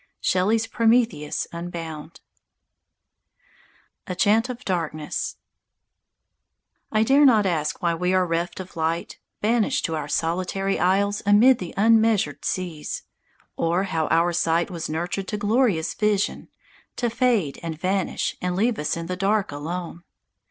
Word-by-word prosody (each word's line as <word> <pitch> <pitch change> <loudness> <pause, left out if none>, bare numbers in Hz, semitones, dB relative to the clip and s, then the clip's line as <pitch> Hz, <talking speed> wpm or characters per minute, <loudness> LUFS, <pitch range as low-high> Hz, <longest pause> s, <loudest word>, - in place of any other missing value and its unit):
_" - - -35 0.2
Shelley's 215 +5 +2
"Prometheus 225 -10 +1
Unbound." 170 -2 -7 1.9
I 180 - -3 2.9
DARE 275 +5 +5
not 220 -5 +4
ask 155 -5 -1
why 170 -1 +2
we 180 +2 0
are 185 -1 +3
reft 170 +2 -2
of 185 -1 -9
light, 165 +1 -2 0.2
Banished 225 +1 +1
to 165 - -2
our 150 -2 -4
solitary 185 +5 -1
isles 200 +3 +2
amid 220 +5 +5
the 180 -3 -7
unmeasured 220 0 +3
seas, 175 -5 -3 0.5
Or 170 +3 +1
how 165 -5 -1
our 170 +2 +2
sight 165 +2 +1
was 165 -3 -5
nurtured 175 +5 -3
to 210 - -3
glorious 205 -5 +1
vision, 210 -1 0 0.5
To 240 - -1
fade 230 - +1
and 160 -2 -5
vanish 190 +1 -1
and 180 0 -1
leave 225 +4 +1
us 150 +2 -1
in 165 - -4
the 180 +2 -3
dark 195 +1 0
alone. 170 +4 -5
180 Hz, 125 wpm, -24 LUFS, 165-210 Hz, 2.9 s, DARE